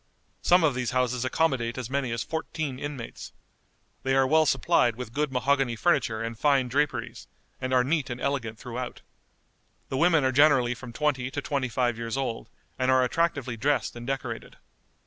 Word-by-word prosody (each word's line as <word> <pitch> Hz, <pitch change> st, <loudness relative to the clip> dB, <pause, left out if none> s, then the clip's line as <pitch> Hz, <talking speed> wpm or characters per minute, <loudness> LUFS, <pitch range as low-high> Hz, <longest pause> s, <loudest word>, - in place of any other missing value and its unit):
Some 180 Hz, 0 st, +4 dB
of 150 Hz, -4 st, +3 dB
these 125 Hz, -2 st, -2 dB
houses 125 Hz, -1 st, +1 dB
accommodate 130 Hz, -5 st, 0 dB
as 125 Hz, -3 st, -4 dB
many 135 Hz, -1 st, -1 dB
as 115 Hz, 0 st, -2 dB
fourteen 155 Hz, -4 st, -4 dB
inmates. 140 Hz, -5 st, -7 dB, 0.7 s
They 135 Hz, 0 st, +1 dB
are 135 Hz, 0 st, +4 dB
well 155 Hz, +3 st, +4 dB
supplied 125 Hz, -10 st, +3 dB
with 120 Hz, -2 st, -7 dB
good 150 Hz, 0 st, 0 dB
mahogany 135 Hz, -1 st, +1 dB
furniture 115 Hz, -6 st, +1 dB
and 115 Hz, 0 st, -4 dB
fine 135 Hz, 0 st, +2 dB
draperies, 145 Hz, +2 st, -1 dB, 0.3 s
and 130 Hz, -, -2 dB
are 125 Hz, -1 st, +4 dB
neat 145 Hz, +1 st, 0 dB
and 120 Hz, 0 st, -4 dB
elegant 125 Hz, -6 st, -2 dB
throughout. 125 Hz, +1 st, -6 dB, 0.9 s
The 130 Hz, -, -2 dB
women 165 Hz, 0 st, +4 dB
are 130 Hz, -, +2 dB
generally 130 Hz, -3 st, +4 dB
from 125 Hz, 0 st, -9 dB
twenty 130 Hz, -1 st, 0 dB
to -, -, -4 dB
twenty 140 Hz, -6 st, -2 dB
five 120 Hz, -1 st, 0 dB
years 115 Hz, +2 st, -3 dB
old, 130 Hz, -4 st, -3 dB, 0.3 s
and 130 Hz, 0 st, +1 dB
are 130 Hz, 0 st, +5 dB
attractively 135 Hz, -3 st, 0 dB
dressed 140 Hz, +3 st, 0 dB
and 120 Hz, 0 st, -8 dB
decorated. 130 Hz, -4 st, -4 dB
130 Hz, 175 wpm, -27 LUFS, 120-145 Hz, 0.9 s, are